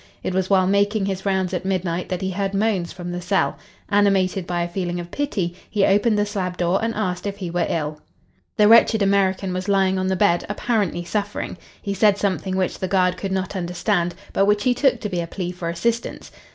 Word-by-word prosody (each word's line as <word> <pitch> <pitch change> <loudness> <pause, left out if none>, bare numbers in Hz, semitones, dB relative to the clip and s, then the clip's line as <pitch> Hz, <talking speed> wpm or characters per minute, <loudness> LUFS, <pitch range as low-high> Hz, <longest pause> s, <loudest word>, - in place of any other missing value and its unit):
It - - -2
was 185 0 0
while 190 -2 +4
making 200 +1 +2
his 195 0 -3
rounds 190 -1 0
at 180 - -2
midnight 180 -2 -2
that 185 -1 -2
he 190 - -1
heard 195 +1 -2
moans 195 -4 0
from 175 0 -6
the 175 0 -4
cell. 190 +2 0 0.3
Animated 195 -3 +2
by 175 -1 -1
a - - -2
feeling 175 0 -3
of 175 0 -7
pity 200 -12 -2 0.2
he 205 -2 +2
opened 210 +2 +3
the 205 - +2
slab 185 -3 -3
door 175 +2 +1
and 225 - +1
asked 185 -2 -2
if 200 0 -4
he 180 -4 -5
were 175 0 0
ill. 150 -2 -2 0.6
The 210 -1 +6
wretched 225 -1 +6
American 195 -1 +1
was 185 +2 -3
lying 190 -1 +2
on 185 - -1
the 190 - +1
bed, 180 -3 +2
apparently 205 -5 -1
suffering. 205 +3 -3 0.3
He 200 - -2
said 205 0 +4
something 190 -1 -1
which 185 -1 -1
the 185 - -2
guard 180 -1 +2
could 195 - -4
not 190 +1 -2
understand 175 -1 -1 0.2
but 195 - +3
which 205 0 +2
he 250 -1 +3
took 270 +1 +2
to 210 - -2
be 180 -4 -2
a 170 - -4
plea 180 0 -4
for 175 -2 -5
assistance. 230 +7 -2
190 Hz, 220 wpm, -22 LUFS, 180-205 Hz, 0.6 s, The